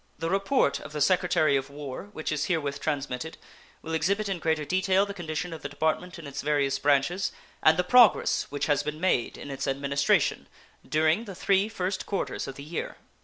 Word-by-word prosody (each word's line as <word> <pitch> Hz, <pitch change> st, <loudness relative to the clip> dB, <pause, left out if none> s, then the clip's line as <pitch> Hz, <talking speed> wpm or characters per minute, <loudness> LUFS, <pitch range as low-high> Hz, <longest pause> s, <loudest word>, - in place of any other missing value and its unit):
The 165 Hz, +2 st, -2 dB
report 195 Hz, -, +2 dB
of -, -, -10 dB
the 150 Hz, -, -3 dB
Secretary 155 Hz, -2 st, +3 dB
of 135 Hz, 0 st, -1 dB
War, 145 Hz, +6 st, -7 dB
which 155 Hz, -6 st, -4 dB
is 150 Hz, -1 st, 0 dB
herewith 145 Hz, -5 st, -1 dB
transmitted, 145 Hz, 0 st, -3 dB, 0.5 s
will 160 Hz, -, -5 dB
exhibit 200 Hz, +7 st, +1 dB
in 195 Hz, -3 st, -2 dB
greater 160 Hz, -2 st, 0 dB
detail 190 Hz, +3 st, +2 dB
the 200 Hz, -, -6 dB
condition 170 Hz, -1 st, -4 dB
of 160 Hz, -, -8 dB
the -, -, -5 dB
Department 160 Hz, +5 st, -1 dB
in 165 Hz, -, -10 dB
its 140 Hz, 0 st, -5 dB
various 140 Hz, -2 st, +1 dB
branches, 145 Hz, +6 st, +2 dB, 0.3 s
and 155 Hz, 0 st, +5 dB
the 180 Hz, -, +2 dB
progress 240 Hz, +1 st, +5 dB
which 145 Hz, -, -2 dB
has 145 Hz, -2 st, +2 dB
been 150 Hz, +1 st, -5 dB
made 175 Hz, -9 st, +1 dB
in 140 Hz, -, -8 dB
its 135 Hz, 0 st, -4 dB
administration 140 Hz, +1 st, +1 dB, 0.4 s
during 155 Hz, +8 st, +1 dB
the 195 Hz, -4 st, -8 dB
three 195 Hz, +3 st, +2 dB
first 190 Hz, -3 st, -3 dB
quarters 195 Hz, -, -3 dB
of 135 Hz, -, -7 dB
the 140 Hz, -, -9 dB
year. 160 Hz, +3 st, -5 dB
155 Hz, 195 wpm, -27 LUFS, 145-185 Hz, 0.5 s, and